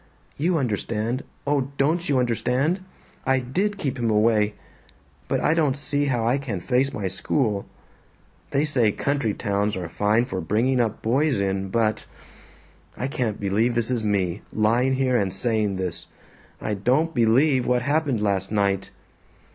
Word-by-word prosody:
You 170 +4 +1
understand 115 0 -2 0.2
oh, 140 -2 +1
DON'T 160 +5 +1
you 140 - +3
understand? 125 - +1 0.4
I 135 0 +2
DID 185 +12 -1
keep 135 -8 -3
him 115 -1 +1
away! 105 -1 +3 0.7
But - - 0
I - - +3
don't 150 -5 +1
see 145 0 0
how 120 -5 0
I 125 +4 +2
can 120 -9 -4
face 130 +7 +1
my 105 - -4
school. 100 +2 -1 0.8
They 140 +2 +1
say 125 -8 +3
country 140 -7 -1
towns 105 -1 -1
are 90 -2 -4
fine 105 +7 +1
for 95 -7 -4
bringing 115 +9 +1
up 110 -2 -2
boys 130 +1 +2
in, 95 0 -1
but 110 +1 0 0.9
I - - -2
can't 125 -7 -2
believe 105 +5 +1
this 120 +1 0
is 120 -3 0
me, 100 -3 0
lying 120 +5 +2
here 130 -2 +2
and 100 -4 0
saying 105 0 0
this. 95 -2 -4 0.5
I 105 - -2
don't 130 +11 +1
BELIEVE 125 +3 +3
what 125 -1 +2
happened 140 -5 0
last 100 -1 0
night. 100 -2 0
120 Hz, 155 wpm, -24 LUFS, 105-135 Hz, 0.9 s, you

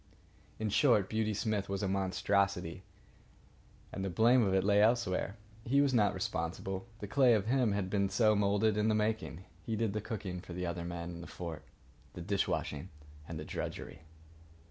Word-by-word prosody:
In 110 -1 -2
short, 105 -4 +3
Beauty 110 -1 0
Smith 105 -1 -1
was 100 +1 -2
a - - +1
monstrosity, 95 -2 0 1.1
and 95 - -3
the 95 - -1
blame 115 +7 +4
of 100 -4 +2
it 95 0 +3
lay 100 +1 +4
elsewhere. 105 -3 +1 0.3
He 135 +5 +2
was 140 -2 +3
not 105 -4 +3
responsible. 95 +3 -3
The 105 - -4
clay 125 +1 +5
of 105 -2 0
him 120 -3 +2
had 100 -2 -1
been 100 0 +1
so 110 +2 +3
moulded 105 +1 +2
in 105 +1 +2
the 110 - +3
making. 105 -6 -1 0.2
He 115 - -2
did 110 -2 0
the 105 - -2
cooking 95 -4 -5
for 90 - -9
the 90 +1 -3
other 85 0 -3
men 85 0 -5
in 85 0 -8
the 85 - -9
fort, 85 -3 -7 0.5
the 90 - -7
dish 100 +3 0
washing 75 +5 -3 0.4
and 80 -2 -5
the 75 - -6
drudgery. 75 +1 -5
100 Hz, 190 wpm, -33 LUFS, 90-110 Hz, 1.1 s, clay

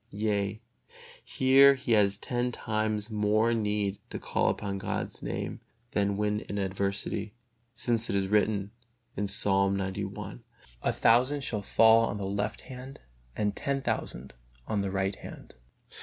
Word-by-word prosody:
Yea, 105 -1 -1 0.6
here 135 +1 +6
he 130 -2 -4
has 100 -3 +4
ten 125 +2 -1
times 110 -1 -2
more 110 +2 +2
need 105 -2 -1
to - - -5
call - - 0
upon 100 -1 -3
God's - - -4
Name - - -4 0.3
than 100 -1 +1
when 105 0 0
in 100 - -6
adversity. 100 +2 -2 0.4
Since 115 -1 -1
it - - 0
is 95 -1 +1
written, 105 -1 +1 0.6
Psalm 100 0 +2
xci, 95 -8 -4 0.4
"A - - +1
thousand 130 +5 +3
shall 110 -6 -2
fall 115 +2 +5
on 100 - -3
the 100 - -3
left 105 +2 -2
hand 130 +1 -10 0.4
and 105 -1 0
ten 140 -2 -2
thousand 65 +2 -3 0.3
on 105 -2 -1
the 100 - -2
right 95 +1 -1
hand." - - -11
105 Hz, 140 wpm, -29 LUFS, 100-115 Hz, 0.6 s, here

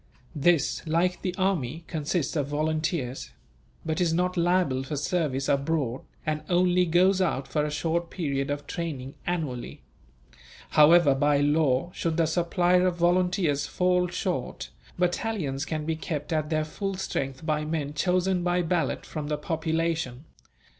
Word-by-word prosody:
This, 160 +1 +2
like 175 +3 +1
the 180 -1 -2
army, 170 -6 -1
consists 155 -1 -2
of 145 -3 0
volunteers; 155 -2 -2 0.6
but 160 +3 -1
is 165 -2 +2
not 180 +1 0
liable 175 -6 +2
for 135 +3 -4
service 140 -2 -1
abroad, 140 -3 0 0.2
and 155 0 -1
only 180 0 +3
goes 185 +3 +4
out 140 -7 0
for 150 - 0
a 150 - -1
short 165 +3 -1
period 140 -6 -2
of 145 0 -3
training, 140 -6 -5
annually. 155 -9 -3 0.9
However, 155 -1 +6
by 145 +1 +2
law, 145 +1 +2
should 165 -1 -2
the 165 - +3
supply 175 +2 +2
of 180 -1 +2
volunteers 175 -4 +1
fall 180 +3 +2
short, 180 +1 -3 0.3
battalions 175 -5 -1
can 155 -2 -3
be 160 0 -1
kept 155 0 -4
at 155 -1 0
their 155 -1 0
full 195 +5 -4
strength 135 -6 -3
by 155 -1 0
men 150 -2 -2
chosen 185 +2 +1
by 175 0 +1
ballot 170 0 -1
from 150 -2 -5
the 150 0 -1
population. 160 -3 -2
160 Hz, 145 wpm, -27 LUFS, 145-180 Hz, 0.9 s, However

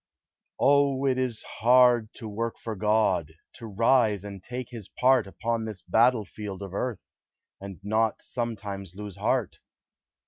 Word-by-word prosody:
O, 140 -1 +3
it 130 -1 +2
is 125 -4 -2
hard 120 -2 +4
to 115 - -8
work 115 +2 -3
for 110 -2 -5
God, 100 -6 +1 0.2
To 115 - -8
rise 110 -1 +2
and 100 -2 -8
take 125 +3 -6
his 110 -5 -8
part 125 -4 +3
Upon 115 +3 -2
this 105 -5 -7
battle 115 +3 +3
field 100 -1 -7
of 95 -2 -8
earth, 115 0 -3 0.6
And 95 -2 -9
not 110 +2 0
sometimes 100 -6 -5
lose 105 -2 -8
heart! - - -1
110 Hz, 145 wpm, -27 LUFS, 100-125 Hz, 0.6 s, hard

